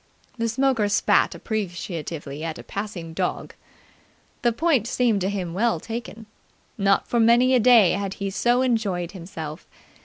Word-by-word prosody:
The 230 0 0
smoker 240 -3 +1
spat 205 - +2
appreciatively 170 -8 -5
at 165 0 -4
a - - -10
passing 195 -5 -6
dog. 180 +2 -3 0.9
The 240 - +3
point 265 -2 +1
seemed 230 -5 +1
to 190 - 0
him 185 -4 -3
well 215 -2 +1
taken. 225 +1 -7 0.5
Not 195 -1 +2
for 240 - 0
many 240 +3 +5
a 255 - +5
day 230 -5 +6
had 200 0 -2
he 200 -1 -4
so 245 +5 +2
enjoyed 200 -8 -1
himself. 165 -4 -8
205 Hz, 150 wpm, -24 LUFS, 180-235 Hz, 0.9 s, day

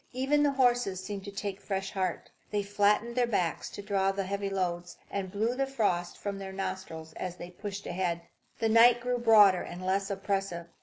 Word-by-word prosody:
Even 270 +4 +2
the 290 -1 +3
horses 245 -7 +2
seemed 195 +1 -5
to 200 - -6
take 200 0 -4
fresh 195 -1 -3
heart. 185 -3 -2 0.2
They 205 -1 0
flattened 205 +3 +2
their 245 -1 +2
backs 180 -7 -1
to 205 - -8
draw 195 -1 +1
the 195 0 -2
heavy 200 +1 -2
loads, 175 -2 -2
and 195 -2 -3
blew 220 +5 0
the 270 +1 0
frost 195 -9 0
from 200 -1 -4
their 195 -1 -6
nostrils 185 -4 -5
as 180 -1 -4
they 175 0 -9
pushed 200 +2 -6
ahead. 175 -1 -1 0.4
The 225 - +1
night 235 +2 +7
grew 245 0 -1
broader 210 -6 +6
and 180 +1 -7
less 195 +1 0
oppressive. 195 -3 -2
195 Hz, 195 wpm, -30 LUFS, 185-220 Hz, 0.4 s, night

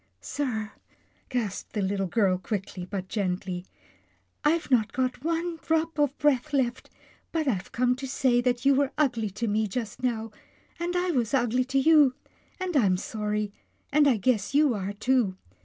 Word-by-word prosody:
" 90 -1 -45
Sir," 220 - -3 0.6
gasped 230 -6 -3
the 210 - -1
little 195 0 0
girl 185 -2 +2
quickly, 190 -2 -4
but 190 -2 -4
gently, 185 -3 -2 0.4
" - - -41
I've 335 -4 -3
not 225 -4 +3
got 255 0 -1
one 335 +1 -1
drop 320 0 -1
of 290 -1 +2
breath 295 0 +1
left, 255 -3 0 0.4
but 320 -3 -1
I've 195 -7 -1
come 250 +1 +2
to 270 0 -5
say 255 -2 +2
that 245 -1 0
you 275 - +6
were 275 0 +1
ugly 240 -8 +1
to 210 +4 -3
me 215 +1 +1
just 220 +2 -5
now, 225 -3 -1 0.5
and 350 +1 -2
I 355 0 +1
was 250 -4 +1
ugly 250 0 +2
to 265 +1 -1
you, 290 -2 +5 0.4
but 370 -2 -3
I'm 195 -9 +4
sorry, 210 +1 -2 0.4
and 295 0 +5
I 255 -5 +4
guess 215 +3 0
you 295 -3 +5
are, 200 -1 -3
too. 220 -3 +1
245 Hz, 175 wpm, -27 LUFS, 205-280 Hz, 0.6 s, you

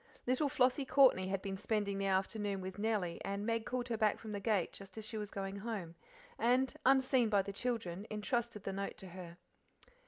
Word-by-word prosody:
Little 260 +4 +2
Flossie 260 +2 +3
Courtney 260 -9 +5
had 195 0 -2
been 195 -1 -3
spending 205 -1 -1
the 195 - 0
afternoon 195 +1 0
with 190 +1 -6
Nellie, 205 -6 0
and 200 +1 -2
Meg 230 -1 0
called 250 0 -2
her 230 - 0
back 215 -1 +3
from 220 - -8
the 205 - -3
gate 200 -4 +1
just 195 +2 -11
as 220 - -4
she 220 - -4
was 210 -2 -3
going 195 -1 -4
home, 200 -6 -4 0.5
and, 255 +3 +3
unseen 265 -3 +4
by 200 -2 +3
the 200 - -6
children, 205 -4 -2
entrusted 225 0 -2
the 195 - -3
note 195 +1 -4
to 190 - -8
her. 175 -1 -9
210 Hz, 205 wpm, -35 LUFS, 195-235 Hz, 0.5 s, Courtney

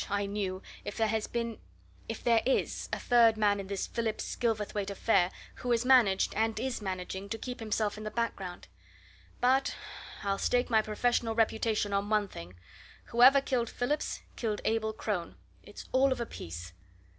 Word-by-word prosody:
I 200 0 0
knew 200 -2 -3 0.2
if - - -6
there 220 -1 +2
has 220 -1 -1
been 235 -1 -3 0.5
if - - -5
there 230 -2 +4
is 265 - 0
a - - 0
third 230 -2 +5
man 205 -1 +3
in 195 - -6
this 195 -1 -2
Phillips 230 -2 -3
Gilverthwaite 210 -4 -1
affair 195 -2 +2 0.3
who 250 - -5
has 235 0 +2
managed, 240 -7 +5
and 220 0 0
is 255 -1 -2
managing, 190 0 -4
to 225 - -2
keep 250 +2 -6
himself 215 -1 -1
in - - -7
the 215 - -3
background. 205 -5 -3 0.7
But 260 +2 +3 0.5
I'll 195 -1 0
stake 245 0 +1
my 220 -1 +5
professional 225 +1 0
reputation 220 -2 +1
on 200 +1 0
one 210 -1 +2
thing 90 - -10 0.5
whoever 255 +4 +7
killed 245 -4 0
Phillips, 290 +5 -2
killed 215 -3 -2
Abel 220 -1 +1
Crone! 205 -5 -3 0.3
It's - - -11
all 265 +1 +4
of 260 - 0
a 235 - -1
piece." 85 - -8
220 Hz, 170 wpm, -30 LUFS, 200-235 Hz, 0.7 s, whoever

